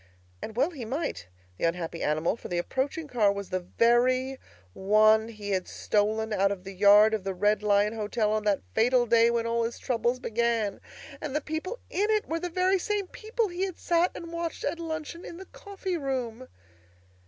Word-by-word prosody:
And 220 - -7
well 275 +8 +2
he 280 -8 -7
might, 230 - -3 0.3
the - - +1
unhappy 165 0 -2
animal; 155 +5 +1
for - - -9
the 175 - -2
approaching 270 - -2
car 220 -7 +3
was 200 -1 -6
the 185 - 0
very 250 +7 +2 0.3
one 215 +2 +4
he 210 -3 -6
had 185 -1 -1
stolen 215 +1 0
out 195 0 +2
of 190 -2 -5
the 195 0 -8
yard 205 +3 +6
of 215 -3 -1
the 195 -1 -3
Red 210 +3 +2
Lion 210 0 +2
Hotel 215 0 -1
on 215 0 0
that 205 - +1
fatal 245 +1 +3
day 230 0 +5
when 235 -1 0
all 230 0 0
his 230 +1 -3
troubles 245 0 -1
began! 230 -3 -1 0.4
And 295 -2 -4
the - - +3
people 320 +10 -4
in 410 +3 0
it 430 -1 +1
were 330 +1 -2
the 355 - -3
very 370 +2 +2
same 415 +1 -1
people 445 0 -2
he 360 +2 -2
had 375 -3 -6
sat 345 +1 +2
and 335 0 -8
watched 335 -1 -4
at 340 - -2
luncheon 325 +1 -5
in 340 - -8
the 380 - -9
coffee 385 -2 -5
room! 255 -4 -3
235 Hz, 200 wpm, -28 LUFS, 210-325 Hz, 0.4 s, yard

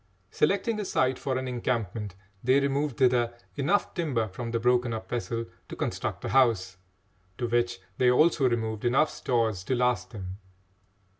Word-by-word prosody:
Selecting 200 +7 +1
a 210 - -2
site 130 -7 +1
for 130 -2 -1
an 130 0 -3
encampment, 115 -5 -2 0.3
they 130 +3 +4
removed 140 -1 0
thither 120 -2 +3 0.2
enough 150 +9 +1
timber 140 - 0
from 115 +5 -5
the 115 0 -1
broken 125 0 +2
up 110 - -7
vessel 115 -1 -3 0.2
to - - -6
construct - - -3
a - - -2
house, 110 -8 +3 0.6
to 120 - -1
which 120 -1 0 0.2
they 125 - +5
also 140 +1 +4
removed 110 -2 -2
enough 135 +6 +3
stores 110 -6 0
to 130 - 0
last 125 -5 +1
them. 95 -3 -7
120 Hz, 160 wpm, -28 LUFS, 115-130 Hz, 0.6 s, they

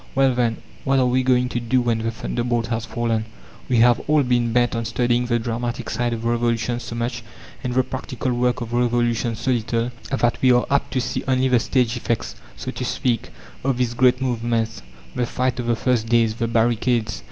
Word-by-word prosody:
Well, 135 -1 +4
then, 120 -2 +1 0.3
What 135 0 +2
are 130 - +4
we 125 +1 +2
going 125 -1 +2
to 120 - -2
do 120 +2 +1
when 120 -2 +1
the 115 0 -1
thunderbolt 120 0 -2
has 115 -1 -2
fallen? 115 -2 -1 0.4
We 125 - +3
have 120 0 +5
all 150 -1 +4
been 120 -2 +1
bent 120 0 +2
on 115 - -1
studying 120 +1 +1
the 120 -1 +2
dramatic 120 +1 -3
side 120 -1 0
of 115 0 -4
revolutions 120 0 0
so 115 0 -6
much, 115 0 -2 0.4
and 125 -1 -2
the 130 - +4
practical 130 0 -4
work 125 +1 0
of 120 0 -5
revolutions 120 -1 +1
so 130 - +1
little, 115 0 0 0.2
that 120 -3 0
we 130 - +5
are 125 - +3
apt 140 - +1
to 130 - +1
see 120 - -3
only 130 0 +2
the 125 -2 +4
stage 125 -1 +1
effects, 115 -1 -2 0.2
so - - -5
to - - -5
speak, 120 -3 -1 0.3
of 135 -1 +1
these 125 -2 0
great 125 +1 +4
movements; 115 -3 -1 0.3
the 125 -1 -1
fight 125 +1 -1
of 120 - -3
the 120 - +2
first 115 -2 0
days; 115 -2 +3
the 115 +1 -2
barricades. 115 -2 +1
120 Hz, 210 wpm, -22 LUFS, 115-125 Hz, 0.4 s, have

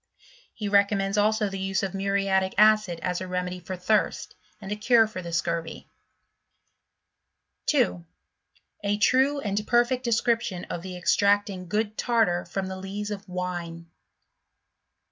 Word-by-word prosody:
He 210 - -4
recommends 200 0 +2
also 215 +1 +2
the 195 -1 -5
use 190 0 -1
of 195 - -2
muriatic 195 -1 0
acid 215 -5 +4
as 180 0 -1
a 185 - -5
remedy 180 0 -3
for 185 +2 -6
thirst, 195 +4 0 0.3
and 200 -1 -8
a - - 0
cure 225 +2 +4
for 215 -4 -7
the 170 -1 -7
scurvy* 170 0 -3 1.8
2. 90 -1 +2 0.8
A 205 0 0
true 265 +6 +3
and 210 -1 -2
perfect 240 +1 +2
Description 230 -5 0
of 170 - -4
the 185 0 -7
extracting 200 +1 +2
i - - -10
good 210 +3 -2
Tartar 225 -8 +1
from 190 +2 -3
the 190 0 -5
Lees 200 +2 -5
of 200 -1 -7
Wine. 175 -2 -5
195 Hz, 145 wpm, -26 LUFS, 180-215 Hz, 1.8 s, acid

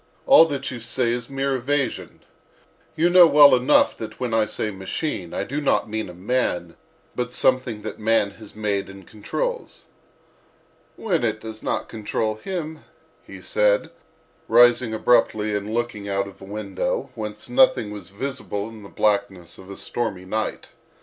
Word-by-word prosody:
—all 270 -11 +8
that 140 -4 -3
you 125 - -6
say 120 +1 0
is 120 +1 -4
mere 135 0 -1
evasion. 135 +2 -2 0.7
You 165 +2 +3
know 175 -1 +8
well 145 -1 +8
enough 130 +3 +4
that 110 -1 -7
when 125 -3 -2
I 110 -1 +2
say 110 0 -3
'machine' 95 - -4
I - - -2
do 145 +3 -4
not 140 - +1
mean 110 -3 -3
a - - -9
man, 90 -4 -1 0.4
but 125 0 -3
something 130 -4 +1
that - - -6
man 110 -2 +2
has 110 +1 -13
made 100 -2 -2
and 95 -1 -12
controls." 485 - -5 1.1
"When 180 - -1
it 110 -2 0
does 110 0 -8
not - - -2
control 110 0 -2
him," 160 - -5 0.4
he - - -12
said, - - +2 0.6
rising 120 0 +5
abruptly 110 -2 +2
and 105 +1 -3
looking 115 -3 -3
out 100 0 -1
of 100 - -14
a - - -9
window, 100 -1 -3
whence 105 -1 -6
nothing 255 - +3
was 100 -4 -9
visible 105 -2 -4
in 110 -1 -12
the 100 - -12
blackness 100 -4 -1
of 95 - -13
a 100 - -8
stormy 105 -6 -4
night. 110 +3 -3
110 Hz, 165 wpm, -23 LUFS, 105-135 Hz, 1.1 s, all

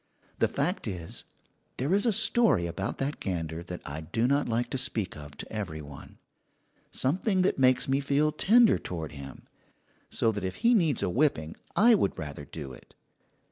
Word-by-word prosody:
The - - +4
fact 145 - -2
is, 90 -5 -6 0.5
there 140 +8 0
is 205 +4 +3
a - - +4
story 220 - +3
about 85 +4 -4
that 140 +2 -3
gander 80 -4 -3
that 90 0 -8
I 75 +3 -5
do 115 +9 -1
not 140 +1 +1
like 120 +1 -1
to 135 - -1
speak 110 -6 -2
of 75 -1 -11
to - - -9
every 95 -8 -4
one 70 -1 -12 0.7
something 185 - +1
that 185 - +1
makes 130 -1 +4
me 135 +1 +2
feel 145 +2 +1
tender 225 +8 +5
toward 80 -4 -5
him; 70 -3 -10 0.7
so 115 - +1
that 105 -2 -5
if 95 0 -3
he 240 - +6
needs 165 - +2
a - - +1
whipping 85 - +1 0.2
I 235 +3 +6
would 150 - +1
rather 75 -3 -6
do 70 -5 -8
it. - - -16
115 Hz, 180 wpm, -28 LUFS, -, 0.7 s, he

